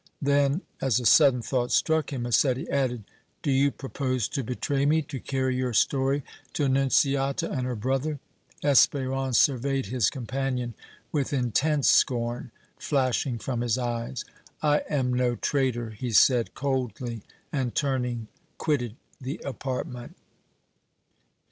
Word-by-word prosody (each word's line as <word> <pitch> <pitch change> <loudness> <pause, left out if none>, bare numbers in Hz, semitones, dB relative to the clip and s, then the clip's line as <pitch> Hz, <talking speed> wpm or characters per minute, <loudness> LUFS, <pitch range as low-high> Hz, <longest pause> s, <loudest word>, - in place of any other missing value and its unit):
Then, 140 +3 +2 0.2
as 130 -3 +2
a 125 - -5
sudden 125 0 +6
thought 125 0 -1
struck 160 -3 +2
him, 130 -4 -3
Massetti 130 +4 +1
added: 125 -5 0 0.4
"Do 145 - +1
you 135 +1 +4
propose 130 -4 -2
to 135 - -2
betray 135 +4 -1
me, 155 +2 +3
to 140 -2 -7
carry 130 -1 -1
your 125 -1 -1
story 135 +4 +2 0.3
to 150 - -1
Annunziata 135 0 +2
and 125 -2 -2
her 125 - -2
brother?" 135 +7 -1 0.5
Espérance 135 -2 +3
surveyed 135 +1 +2
his 125 -5 +1
companion 130 -2 -3 0.4
with 145 -2 -1
intense 140 +3 +1
scorn 120 0 +2 0.3
flashing 130 -3 0
from 120 +1 -3
his 120 -1 +1
eyes. 120 0 -3 0.4
"I 150 -1 +4
am 130 -4 0
no 125 -1 +1
traitor!" 120 -4 -1
he 120 +3 -5
said, 120 +1 +4
coldly, 125 -4 -2 0.3
and, 130 -4 -1
turning, 125 -5 -1 0.3
quitted 125 -8 -1 0.3
the 135 +6 -5
apartment. 125 -2 -5
130 Hz, 130 wpm, -26 LUFS, 120-140 Hz, 0.5 s, sudden